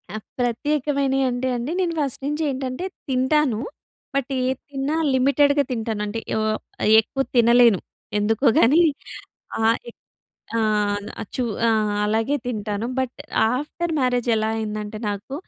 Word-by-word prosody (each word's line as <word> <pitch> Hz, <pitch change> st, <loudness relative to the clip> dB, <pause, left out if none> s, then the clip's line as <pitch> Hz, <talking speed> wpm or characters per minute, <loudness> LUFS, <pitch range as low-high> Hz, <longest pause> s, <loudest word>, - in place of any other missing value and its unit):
ఆ! 200 Hz, -, -7 dB, 0.2 s
ప్రత్యేకమైనియి 270 Hz, +2 st, 0 dB
అంటే 245 Hz, +1 st, -2 dB
అండి. 240 Hz, +5 st, -3 dB
నేను‌ 345 Hz, -3 st, 0 dB
ఫస్ట్ 275 Hz, -3 st, -2 dB
నించి 295 Hz, +2 st, -1 dB
ఏంటంటే 260 Hz, +5 st, -4 dB, 0.2 s
తింటాను. 260 Hz, -2 st, +2 dB, 0.6 s
బట్ 275 Hz, -2 st, 0 dB
ఏది 255 Hz, +1 st, 0 dB
తిన్నా 280 Hz, +2 st, -2 dB, 0.2 s
లిమిటెడ్‌గా 285 Hz, +2 st, +3 dB
తింటానంటే. 220 Hz, -2 st, -2 dB, 0.2 s
ఆహ్, 215 Hz, 0 st, 0 dB, 0.4 s
యెక్కువ 225 Hz, +5 st, +3 dB
తినలేను 235 Hz, -3 st, +6 dB, 0.4 s
ఎందుకో 220 Hz, +5 st, 0 dB
గానీ 290 Hz, +9 st, +5 dB, 0.8 s
ఆహ్, 225 Hz, +1 st, +3 dB
ఎక్ -, -, -17 dB, 0.6 s
ఆ! -, -, +2 dB, 0.6 s
అది -, -, -7 dB
చు 255 Hz, -, 0 dB, 0.3 s
ఆ! -, -, +4 dB, 0.3 s
అలాగే 225 Hz, +7 st, +1 dB
తింటాను. 215 Hz, -2 st, -2 dB
బట్ 260 Hz, -1 st, -2 dB, 0.4 s
ఆఫ్టర్ 310 Hz, +5 st, -3 dB
మ్యారేజ్ 250 Hz, -2 st, +1 dB
ఎలా 220 Hz, 0 st, 0 dB
అయిందంటే 215 Hz, -1 st, -4 dB
నాకు 205 Hz, +6 st, -5 dB
250 Hz, 130 wpm, -23 LUFS, 220-275 Hz, 0.8 s, తినలేను